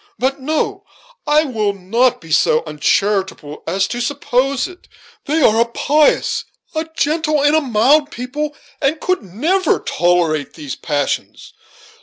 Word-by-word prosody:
But 270 +2 -1
no 315 +8 -2 0.4
I 300 +1 +4
will 215 -8 -1
not 230 +7 +1
be 165 -1 -12
so 155 0 +3
uncharitable 185 0 -1
as 190 +3 +1
to 240 - -3
suppose 265 0 0
it. 365 0 -15 0.4
They 305 +1 +1
are 225 0 +5
a - - +4
pious, 290 +5 +2 0.3
a 315 0 -3
gentle, 305 -1 +1
and 295 +1 +4
a 315 - +4
mild 275 +4 +3
people, 295 +5 -4 0.3
and 300 +3 +1
could 370 +2 0
never 305 - +1
tolerate 170 -4 0
these 145 -5 -6
passions. 145 -2 -3
255 Hz, 140 wpm, -18 LUFS, 195-300 Hz, 0.4 s, are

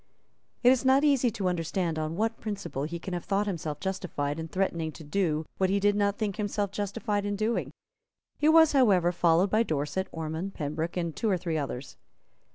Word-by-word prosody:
It 245 - +8
is 260 -1 +2
not 265 +2 +4
easy 275 -4 +4
to 205 -4 -2
understand 170 -1 -1
on 155 +1 -2
what 225 +4 -1
principle 200 -10 -4
he 170 +3 -4
can 180 +2 -6
have 175 - -3
thought 200 +1 +1
himself 160 -6 -3
justified 165 -6 -3
in 160 - -4
threatening 170 -3 -1
to 160 - -11
do 155 -1 0
what 190 -1 +3
he 200 +1 +2
did 205 +1 +3
not 205 0 +1
think 205 -3 -2
himself 205 -1 -1
justified 205 +1 -2
in 205 0 -2
doing. 215 +3 -1 0.7
He 300 - +4
was, 320 -1 +7
however, 200 - +4
followed 175 +2 +3
by 215 - +4
Dorset, 160 0 -1
Ormond, 160 +4 -4
Pembroke, 155 +3 -3
and 170 -3 -2
two 225 - 0
or 190 - +2
three 170 -2 -3
others. 140 -3 -4
190 Hz, 195 wpm, -28 LUFS, 165-210 Hz, 0.7 s, It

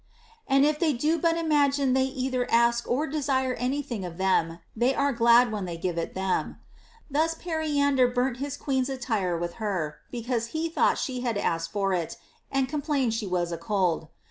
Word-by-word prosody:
And 275 +1 +4
if 300 0 +1
they 320 -4 +2
do 305 +7 +1
but 330 +1 +2
imagine 285 -4 +2
they 260 0 +3
either 260 -2 -2
ask 235 0 +3
or 275 +6 +1
desire 270 -3 0
any 255 +4 -1
thing 230 -7 -5
of 175 -2 -7
them, 175 -3 +1 0.2
they 245 +4 +2
are 280 0 +1
glad 235 0 +5
when 210 -3 -3
they 170 -2 -5
give 175 0 -2
it 165 - -4
them. 190 0 -1 0.5
Thus 320 +3 +1
Periander 290 -6 +1
burnt 245 0 0
his 285 +2 -4
queen's 265 -2 -1
attire 220 -9 -1
with 170 0 -4
her, 175 -8 -2
because 235 -1 -2
he 330 +1 -1
thought 325 - +2
she 255 -2 -3
had 235 -4 -1
asked 165 -4 -1
for 195 -2 0
it 170 -3 -2 0.3
and 270 -1 +1
complained 285 -4 0
she 225 -2 -2
was 175 -2 -1
a 170 - -4
cold. 175 -3 0
250 Hz, 190 wpm, -27 LUFS, 195-280 Hz, 0.5 s, glad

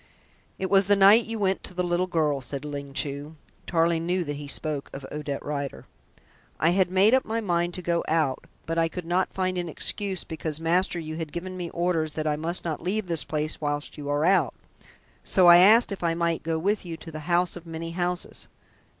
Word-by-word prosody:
"It 190 - -3
was 195 -1 +5
the 205 - +5
night 200 +4 +7
you 225 0 -4
went 195 -2 0
to 180 - -8
the 180 - 0
little 175 +1 0
girl," 150 -5 0
said 140 +3 -6
Ling 140 -1 -6
Chu 145 +2 -3 0.3
(Tarling 165 0 +1
knew 180 0 +1
that 145 -2 -4
he 145 0 -7
spoke 145 0 -4
of 135 0 -7
Odette 150 -2 -4
Rider). 140 -2 -4 0.7
"I 165 +3 +4
had 185 0 +2
made 195 +5 +4
up 260 - +4
my 225 +1 -2
mind 175 -4 0
to 180 - -4
go 170 0 0
out, 155 -5 0 0.2
but 165 +1 -1
I 165 - +3
could 175 +1 -7
not 180 +2 0
find 185 -1 0
an 175 -1 -3
excuse 190 +3 -3
because, 160 -1 -4
master, 175 +2 +1
you 155 -1 -6
have 160 -3 -5
given 185 +2 -5
me 175 -2 -4
orders 170 -3 -1
that 155 0 -3
I 150 -1 +1
must 165 +4 -1
not 160 -3 -3
leave 195 +4 -1
this 170 -3 0
place 155 0 -2
whilst 145 0 -3
you 145 -1 -6
are 145 +2 +1
out. 185 -5 +3 0.7
So 185 - +4
I 175 0 +10
asked 215 +6 +6
if 195 - -5
I 165 -1 +1
might 170 -1 0
go 160 0 -1
with 200 +6 0
you 170 -3 -6
to 165 - -10
the 155 - -6
house 175 0 +2
of 175 -1 -10
many 165 0 -5
houses." 175 +1 -3
170 Hz, 220 wpm, -26 LUFS, 155-185 Hz, 0.7 s, I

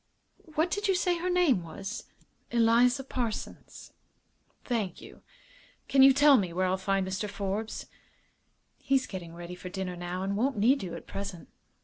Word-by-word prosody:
What 320 +3 +1
did 410 +1 -1
you 385 - +3
say 355 -1 +1
her 360 +2 -1
name 350 - +3
was?" 195 +6 -7 0.4
"Eliza 240 +3 +4
Parsons." 240 -5 -5 0.7
"Thank 215 -8 -2
you. - - -13 0.7
Can 270 - +4
you 270 +1 +9
tell 285 +1 +6
me 185 -6 -1
where 185 +2 0
I'll 185 0 +2
find 195 0 0
Mr. 190 +2 -3
Forbes?" 200 +2 -4 0.9
"He's 270 -1 +1
getting 170 -3 -8
ready 175 +1 -8
for 180 0 -8
dinner, 185 -1 -4
now, 175 +1 -4
and 195 +1 -1
won't 250 +3 0
need 250 +7 +4
you 180 -3 -5
at - - -9
present." 195 -4 -7
210 Hz, 160 wpm, -29 LUFS, 185-270 Hz, 0.9 s, you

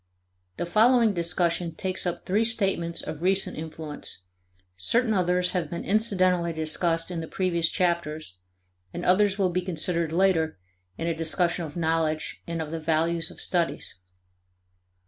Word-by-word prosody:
The - - -2
following 225 +4 +4
discussion 170 -1 0
takes 185 0 -2
up 175 0 -4
three 205 +4 +2
statements 195 -7 +1
of 155 - -6
recent 190 +2 +2
influence; 155 - -5 0.5
certain 225 - +1
others 180 -1 +1
have 175 -5 -2
been 170 - -5
incidentally 185 -5 +2
discussed 165 +2 -1
in 175 - -3
the 160 - -5
previous 170 -3 0
chapters, 160 - -2 0.6
and - - -4
others 195 +1 +3
will 190 -3 +1
be 180 +1 0
considered 170 -2 -1
later 165 - +2 0.4
in - - -3
a 170 - 0
discussion 165 +2 +1
of 150 +2 -9
knowledge 160 -1 -1
and 165 -1 -2
of 155 - -8
the 165 - -3
values 165 +1 +1
of - - -11
studies. 175 -2 -1
170 Hz, 145 wpm, -26 LUFS, 160-185 Hz, 0.6 s, following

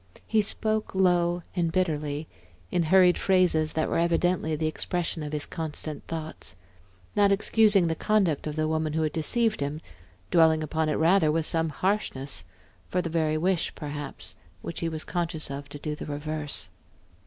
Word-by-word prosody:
He 220 -1 +3
spoke 215 0 0
low 175 -2 +2
and 170 -3 +1
bitterly, 155 -4 -1 0.4
in 175 - +2
hurried 180 +2 +5
phrases 180 -5 +3
that 155 - 0
were - - 0
evidently 170 -1 +1
the 155 +1 -2
expression 165 +1 -1
of 150 -1 -5
his 150 -1 -2
constant 155 -2 -5
thoughts; 160 - -6 0.6
not 205 -1 +4
excusing 205 -1 +4
the 165 - +1
conduct 180 -5 +1
of 150 - -4
the 155 0 0
woman 155 -1 -1
who 160 0 +1
had 155 -1 -1
deceived 220 +7 +1
him, 145 +2 -2 0.5
dwelling 160 -2 +5
upon 155 +1 -1
it 150 - +1
rather 165 -1 +4
with 160 0 0
some 165 0 +1
harshness, 145 - -2 0.4
for 180 - 0
the 165 - -4
very 155 -2 +1
wish 180 +1 0
perhaps 145 - -6 0.3
which 170 - -5
he 165 - -1
was 155 -1 -4
conscious 165 -4 -3
of 140 +1 -6
to 145 - -8
do 150 +1 -4
the - - -8
reverse. 150 0 -3
160 Hz, 170 wpm, -27 LUFS, 155-180 Hz, 0.6 s, hurried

